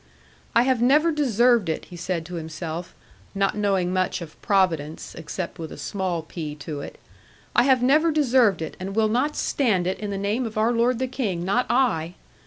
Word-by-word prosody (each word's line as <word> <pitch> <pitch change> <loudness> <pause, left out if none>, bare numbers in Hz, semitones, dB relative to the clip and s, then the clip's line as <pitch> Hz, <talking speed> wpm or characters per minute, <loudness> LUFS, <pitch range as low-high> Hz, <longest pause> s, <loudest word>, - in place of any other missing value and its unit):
'I 235 - +6
have 255 -2 +1
never 300 +7 +4
deserved 240 - +3
it,' 160 - -2
he 180 - -12
said 170 -1 -3
to 180 - -9
himself, 165 +1 -6 0.4
not 195 0 +1
knowing 195 -3 +1
much 185 -1 0
of 165 -3 -11
Providence, 165 -6 0
except 170 +2 -6
with 160 -1 -6
a - - -8
small 175 +2 -2
p 155 -2 -6
to 145 0 -6
it; - - -9 0.6
'I - - +6
have 260 -2 +4
never 305 +6 +4
deserved 250 - +3
it, 160 - -6
and 195 +2 -5
will 220 -1 +3
not 255 +7 0
stand 215 -10 +1
it 185 - -2
in 210 - -4
the 200 - -3
name 210 +5 -1
of 215 0 -8
our 220 +2 +3
lord 240 +1 +2
the 260 +2 -1
King, 210 -10 -2
not 220 +7 +1
I!' 185 -10 +1
200 Hz, 195 wpm, -24 LUFS, 170-245 Hz, 0.6 s, I